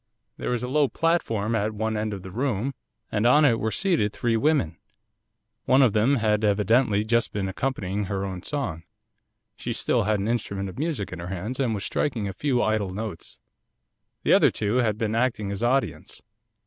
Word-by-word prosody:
There - - -3
was 125 -1 -1
a - - -2
low 145 +2 +3
platform 115 -11 0
at 110 -1 0
one 110 +1 -1
end 105 0 -1
of 100 -2 -6
the 95 - -8
room, 125 +2 -1 0.4
and 105 +2 +2
on 150 +5 +6
it 115 -5 +3
were 110 - 0
seated 165 - +1
three 115 +1 0
women. 120 - +1 0.9
One 130 +2 +5
of 120 -6 +3
them 115 +6 +3
had 110 -3 +1
evidently 105 +1 +3
just 115 +1 +1
been 100 -2 -2
accompanying 100 -2 -2
her 95 +1 -2
own 95 -2 -5
song, 105 - -3 0.7
she - - -4
still - - 0
had 105 -1 +1
an 100 - -2
instrument 100 -4 -2
of 95 - -9
music 145 - -2
in 90 - -7
her 85 - -6
hands, 95 +8 -4
and 120 -5 +1
was 100 - -4
striking 115 -8 -1
a 95 - -4
few 125 +3 0
idle 110 -2 0
notes. 100 -2 -6 0.9
The - - +4
other - - +6
two 105 +3 -1
had 110 -4 +1
been 110 -1 -1
acting 115 -4 0
as 100 +1 -4
audience. 130 +3 -1
110 Hz, 195 wpm, -25 LUFS, 100-125 Hz, 0.9 s, on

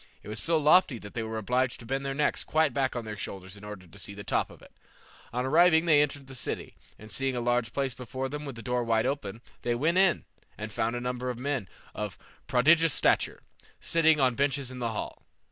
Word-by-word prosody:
It - - -10
was 105 0 -3
so 165 +5 +2
lofty 155 -2 +5
that 100 -2 -10
they 115 - -2
were 110 0 -4
obliged 125 +4 0
to 115 - -10
bend 135 +3 -2
their 135 0 -3
necks 150 +1 +1
quite 155 -3 +2
back 130 0 0
on 120 -2 -3
their 105 -1 -5
shoulders 95 -1 -6
in 100 - -13
order 105 -3 -8
to 95 +4 -14
see 100 - -5
to - - -12
the 100 - -7
top - - 0
of - - -14
it. - - -16 0.6
On 125 +2 -1
arriving 160 +3 +5
they 150 -3 +6
entered 145 -1 -1
the 135 - -11
city, 125 - -4 0.2
and 110 0 -12
seeing 135 +3 0
a - - -1
large 120 -1 +1
palace 135 -2 -1
before 130 +2 -4
them 150 +2 -5
with 140 -4 -6
the 115 - -9
door 125 -1 0
wide 115 -1 +2
open, 115 -6 -3 0.2
they 120 -1 0
went 165 +9 +2
in, 190 -6 +3 0.3
and 110 0 -5
found 115 +3 -1
a 120 - -3
number 125 0 -2
of 125 - -3
men 130 -6 -2 0.2
of 105 -2 -5 0.3
prodigious 155 +5 +4
stature, - - +2 0.4
sitting 160 -2 +3
on 130 -2 +4
benches 140 0 0
in 130 - -7
the 120 -1 -1
hall. 110 - -5
125 Hz, 240 wpm, -29 LUFS, 115-145 Hz, 0.6 s, they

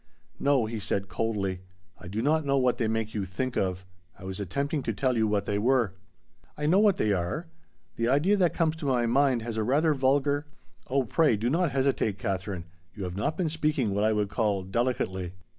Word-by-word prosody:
"No," 140 -4 +3
he 110 0 -4
said 100 -1 -2
coldly, 100 -5 -2 0.4
"I - - -10
do 105 +5 -3
not 155 +3 +2
know 140 -1 +1
what 125 -2 +2
they 115 - +1
make 110 0 -2
you 105 - -2
'think 120 +7 -3
of.' 95 -1 -1 0.3
I - - -13
was 95 0 -5
attempting 140 - -2
to - - -2
tell 130 -2 0
you 110 -1 +2
what 105 -1 0
they 100 0 -1
were." 120 -3 +2 0.6
"I 150 - -2
know 175 +6 +4
what 205 -3 +4
they 105 -1 +2
are. 90 - -2 0.5
The 115 - +1
idea 145 +11 +3
that 180 -3 +3
comes 160 -2 +1
to 155 -3 -4
my 125 -3 +2
mind 130 0 +2
has 115 -1 -4
a 110 - +1
rather 150 +7 +3
vulgar 140 +2 +1 0.2
" - - -33
"Oh, 135 +1 +2
pray 145 -1 +2
do 115 +4 0
not 170 +2 +2
hesitate, 130 -6 +1
Katherine. 95 -3 -3 0.3
You 100 - -5
have 90 -1 -4
not 105 +10 -1
been 180 - 0
speaking 150 -8 0
what 100 +1 +1
I 110 - +3
would 105 -2 0
call 100 -2 0
delicately." 95 -4 -1
120 Hz, 215 wpm, -28 LUFS, 100-140 Hz, 0.6 s, know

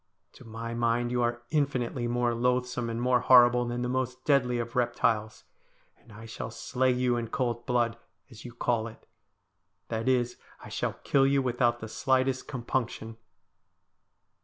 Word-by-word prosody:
To - - -15
my 115 0 -6
mind 120 +1 0
you 125 0 +1
are 120 0 -1
infinitely 130 -5 0
more 120 0 +1
loathsome 125 0 0
and 115 0 -3
more 125 0 +3
horrible 125 -1 +6
than 120 +1 -3
the - - -1
most 130 0 -3
deadly 125 -4 +3
of 120 0 -4
reptiles, 115 -3 0 0.5
and 120 - -21
I 110 +2 -11
shall 115 0 -6
slay 130 +3 -1
you 125 -1 +1
in 115 -1 -3
cold 120 -1 -2
blood, 120 -2 +1 0.3
as 110 - -12
you 120 - -8
call 115 -1 -1
it. 115 - -13 0.8
That 115 +2 -1
is, 125 -2 +1 0.2
I - - -11
shall - - -2
kill 135 -1 +3
you 140 0 +2
without 120 -1 +1
the 110 - -5
slightest 130 +2 0
compunction.' 120 -3 -3
120 Hz, 160 wpm, -28 LUFS, 115-125 Hz, 0.8 s, horrible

